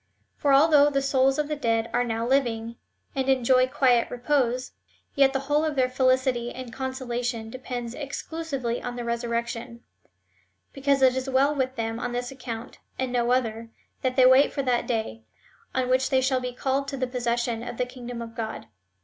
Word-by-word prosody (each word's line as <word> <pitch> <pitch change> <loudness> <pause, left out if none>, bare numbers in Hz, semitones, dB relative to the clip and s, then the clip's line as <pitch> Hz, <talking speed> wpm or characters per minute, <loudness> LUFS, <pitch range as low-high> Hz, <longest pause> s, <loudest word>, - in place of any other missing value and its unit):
^ - - -46 0.3
For 285 - +1
although 290 +1 +6
the 275 -1 +1
souls 270 0 +2
of 300 -1 0
the 300 - -2
dead 230 -5 0
are 245 - +2
now 230 -1 -2
living, 235 -3 0 0.4
and 265 0 -1
enjoy 255 0 +4
quiet 255 -4 +3
repose, 250 -1 0 0.4
yet 275 -1 +4
the 270 0 -1
whole 290 +2 +1
of 310 -2 -1
their 255 -2 +2
felicity 255 -2 +1
and 255 -2 -8
consolation 245 -3 -3
depends 245 -2 -5
exclusively 280 -3 -4
on 245 0 -5
the 240 - -4
resurrection; 235 0 -3 0.9
because 275 0 +1
it 260 -1 +5
is 260 +1 -2
Avell 270 +3 +2
with 260 -1 -1
them 225 -1 -3
on 245 0 -3
this 245 +1 -3
account, 245 -2 -7 0.2
and 260 -1 -2
no 240 -1 +1
other, 230 -2 0 0.3
that 255 -1 0
they 255 - +6
wait 260 +2 +6
for 275 - -2
that 250 -2 0
day, 220 - -2 0.5
on 260 -1 +1
which 255 +1 +2
they 265 - +3
shall 260 0 +1
be 250 0 -4
called 270 +2 -1
to 275 - -4
the 255 - 0
possession 240 -2 -1
of 240 -1 -6
the 250 - 0
kingdom 245 -1 -7
of 230 0 -10
God. 220 -1 -5
255 Hz, 190 wpm, -26 LUFS, 235-270 Hz, 0.9 s, although